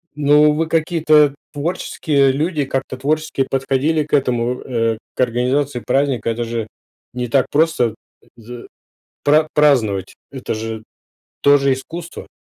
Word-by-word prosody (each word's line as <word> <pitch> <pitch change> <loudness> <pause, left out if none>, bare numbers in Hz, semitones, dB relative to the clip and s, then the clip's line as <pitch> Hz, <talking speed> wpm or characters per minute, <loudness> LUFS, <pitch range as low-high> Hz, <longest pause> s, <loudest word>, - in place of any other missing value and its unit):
Ну 150 +1 +4
вы 160 +1 -1
какие-то 155 -3 +3 0.2
творческие 145 -3 0
люди, 150 +1 -1
как-то 135 -1 -3
творчески 145 0 -1
подходили 135 +4 0
к 150 - -18
этому, 125 -3 0
э, 115 -3 -1 0.2
к - - -7
организации 125 +2 0
праздника. 130 -1 0
Это 120 +1 -2
же 115 -1 -4 0.5
не 125 -1 -4
так 135 +1 +2
просто, 145 -7 +1 0.3
э, - - -26
за 120 +1 -10 0.6
пра 155 +2 +4
праздновать- 115 -11 +2 0.2
это 130 -4 -5
же 110 0 -5 0.6
тоже 140 -1 +4
искусство. 165 +6 -7
135 Hz, 130 wpm, -18 LUFS, 120-150 Hz, 0.6 s, Ну